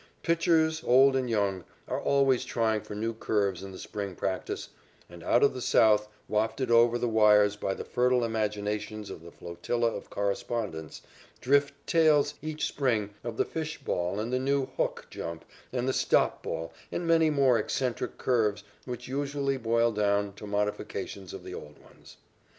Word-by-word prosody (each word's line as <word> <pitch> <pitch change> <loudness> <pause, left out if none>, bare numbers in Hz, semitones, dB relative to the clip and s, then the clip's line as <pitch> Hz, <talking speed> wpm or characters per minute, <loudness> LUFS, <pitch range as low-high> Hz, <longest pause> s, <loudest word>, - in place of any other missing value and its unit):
Pitchers, 165 -1 +2
old 135 +2 +5
and 130 -2 0
young, 100 -5 0 0.2
are - - -2
always 135 -2 +3
trying 115 -4 0
for 105 - -8
new 115 +2 -2
curves 100 -4 -1
in 95 0 -8
the 95 - -9
spring 100 -2 -5
practice, 95 +1 -3 0.4
and 85 -1 -12
out 120 - +3
of 140 - +4
the 130 - -6
South, 105 -2 +4 0.2
wafted 110 +4 0
over 120 0 +5
the 120 - -1
wires 105 -2 +5
by 95 -2 -2
the - - -7
fertile 125 0 +2
imaginations 105 -1 -2
of - - -8
the 85 - -11
flotilla 115 +9 -2
of - - -8
correspondents, 100 -5 -3 0.4
drift 140 +2 +2
tales 155 -3 +4
each 155 0 -3
spring 115 -7 0
of 115 -1 -5
the - - +2
"fish" 160 -1 -4
ball 90 +3 -2
and 115 +3 -3
the 130 - +2
new 135 +1 +1
"hook" - - -1
jump 85 -1 -6 0.3
and 125 0 -1
the 130 - +1
"stop" - - +2
ball 80 0 -5 0.2
and 175 - -3
many 165 -1 +4
more 135 -5 +3
eccentric 125 +3 -2
curves 105 -5 +1 0.2
which 125 -1 -6
usually 140 0 -1
boil 115 -1 +2
down 100 -1 +1
to 105 +1 -10
modifications 100 -2 -3
of - - -8
the - - -8
old 75 -1 -9
ones. - - -18
115 Hz, 170 wpm, -28 LUFS, 105-130 Hz, 0.4 s, old